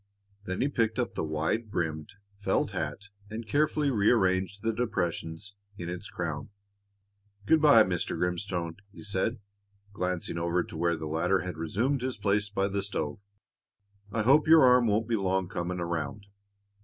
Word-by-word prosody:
Then 95 Hz, -1 st, -3 dB
he 135 Hz, -, +3 dB
picked 115 Hz, -5 st, 0 dB
up 125 Hz, -, -1 dB
the -, -, -2 dB
wide 80 Hz, +9 st, -1 dB
brimmed 80 Hz, -3 st, -3 dB, 0.2 s
felt 100 Hz, -, 0 dB
hat 100 Hz, 0 st, -4 dB, 0.2 s
and 110 Hz, +1 st, -6 dB
carefully 150 Hz, +3 st, +2 dB
rearranged 100 Hz, -4 st, +2 dB
the 115 Hz, 0 st, +1 dB
depressions 100 Hz, -4 st, -2 dB, 0.2 s
in 85 Hz, -2 st, -5 dB
its 90 Hz, +3 st, -6 dB
crown. 80 Hz, -4 st, -4 dB, 1.0 s
"Good 160 Hz, +7 st, +4 dB
by, 145 Hz, -8 st, +8 dB
Mr. 90 Hz, -3 st, -2 dB
Grimstone," 90 Hz, -1 st, -2 dB
he 85 Hz, -5 st, -12 dB
said, 105 Hz, +4 st, -1 dB, 0.6 s
glancing 90 Hz, -3 st, -2 dB
over 85 Hz, +1 st, +1 dB
to -, -, -11 dB
where 85 Hz, +1 st, +1 dB
the 80 Hz, -, -5 dB
latter 80 Hz, +5 st, +1 dB
had 90 Hz, -2 st, -5 dB
resumed 115 Hz, -, 0 dB
his 130 Hz, 0 st, -3 dB
place 105 Hz, 0 st, +1 dB
by 100 Hz, -1 st, 0 dB
the 100 Hz, 0 st, -1 dB
stove. 100 Hz, +2 st, -3 dB, 0.9 s
"I 110 Hz, -, 0 dB
hope 140 Hz, +7 st, +5 dB
your 160 Hz, -2 st, +8 dB
arm 125 Hz, -2 st, +6 dB
won't 105 Hz, +1 st, +1 dB
be 115 Hz, -1 st, +1 dB
long 95 Hz, -1 st, 0 dB
coming 90 Hz, +1 st, -3 dB
around." 85 Hz, +3 st, -3 dB
95 Hz, 160 wpm, -29 LUFS, 85-115 Hz, 1.0 s, by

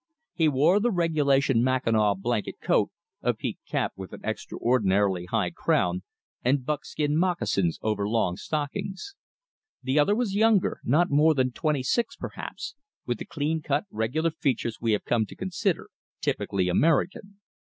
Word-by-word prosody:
He 165 Hz, -3 st, +2 dB
wore 155 Hz, +7 st, +4 dB
the 240 Hz, +3 st, +2 dB
regulation 145 Hz, -, +2 dB
mackinaw 115 Hz, -5 st, +2 dB
blanket 110 Hz, +3 st, -2 dB
coat, -, -, +2 dB, 0.3 s
a -, -, +1 dB
peaked -, -, -6 dB
cap -, -, -1 dB
with 95 Hz, -1 st, -9 dB
an -, -, -9 dB
extraordinarily 100 Hz, -6 st, +1 dB
high 90 Hz, -2 st, 0 dB
crown, 90 Hz, +1 st, +1 dB, 0.4 s
and 130 Hz, +1 st, +1 dB
buckskin 150 Hz, 0 st, -1 dB
moccasins 165 Hz, -, +1 dB
over 105 Hz, -2 st, 0 dB
long 110 Hz, -6 st, +1 dB
stockings. 155 Hz, -, -4 dB, 0.7 s
The 130 Hz, +3 st, +2 dB
other 175 Hz, +8 st, +4 dB
was 230 Hz, -4 st, -1 dB
younger, 215 Hz, -1 st, +3 dB
not 160 Hz, +7 st, +2 dB
more 155 Hz, +2 st, +5 dB
than 130 Hz, -1 st, +1 dB
twenty 150 Hz, 0 st, -1 dB
six 235 Hz, -, 0 dB
perhaps, 455 Hz, -, -6 dB, 0.3 s
with 120 Hz, -2 st, -2 dB
the -, -, -5 dB
clean 155 Hz, +2 st, -2 dB
cut, 145 Hz, 0 st, 0 dB
regular 130 Hz, +10 st, 0 dB
features 130 Hz, -7 st, -1 dB
we 115 Hz, -2 st, +2 dB
have 105 Hz, -, -1 dB
come 115 Hz, -3 st, +1 dB
to -, -, -11 dB
consider 190 Hz, 0 st, -2 dB, 0.3 s
typically 95 Hz, -2 st, -1 dB
American. 170 Hz, -, +1 dB
140 Hz, 150 wpm, -26 LUFS, 110-165 Hz, 0.7 s, more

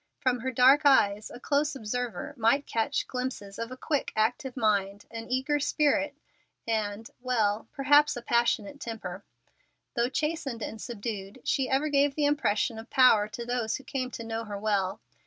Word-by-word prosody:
From 255 Hz, -2 st, +1 dB
her 260 Hz, +3 st, -2 dB
dark 260 Hz, +4 st, +6 dB
eyes 210 Hz, -7 st, +4 dB
a 240 Hz, -, -10 dB
close 290 Hz, +2 st, 0 dB
observer 235 Hz, -3 st, -4 dB
might 275 Hz, +4 st, +2 dB
catch 230 Hz, +5 st, -1 dB
glimpses 250 Hz, -6 st, -5 dB
of 230 Hz, +1 st, -4 dB
a 255 Hz, -, -7 dB
quick, 290 Hz, +1 st, -1 dB
active 245 Hz, +4 st, 0 dB
mind, 205 Hz, -3 st, 0 dB
an 230 Hz, 0 st, -7 dB
eager 265 Hz, +4 st, +1 dB
spirit, 290 Hz, 0 st, +1 dB, 0.5 s
and 215 Hz, -1 st, -2 dB
well, 225 Hz, -4 st, 0 dB
perhaps 290 Hz, 0 st, +4 dB
a 240 Hz, -, -7 dB
passionate 235 Hz, +2 st, +1 dB
temper. 205 Hz, -6 st, -6 dB, 0.7 s
Though 235 Hz, +1 st, +1 dB
chastened 280 Hz, -6 st, -2 dB
and 220 Hz, -, -6 dB
subdued, 205 Hz, -3 st, -6 dB
she 265 Hz, -2 st, 0 dB
ever 275 Hz, +3 st, +1 dB
gave 280 Hz, -1 st, +2 dB
the 300 Hz, -, +1 dB
impression 230 Hz, -6 st, +1 dB
of 225 Hz, -, -11 dB
power 230 Hz, -5 st, +5 dB
to 235 Hz, +2 st, -7 dB
those 240 Hz, -2 st, -1 dB
who 270 Hz, -, -7 dB
came 255 Hz, -1 st, -3 dB
to 230 Hz, -, -7 dB
know 225 Hz, 0 st, -3 dB
her 205 Hz, -1 st, -5 dB
well. 200 Hz, -2 st, 0 dB
240 Hz, 170 wpm, -28 LUFS, 215-275 Hz, 0.7 s, dark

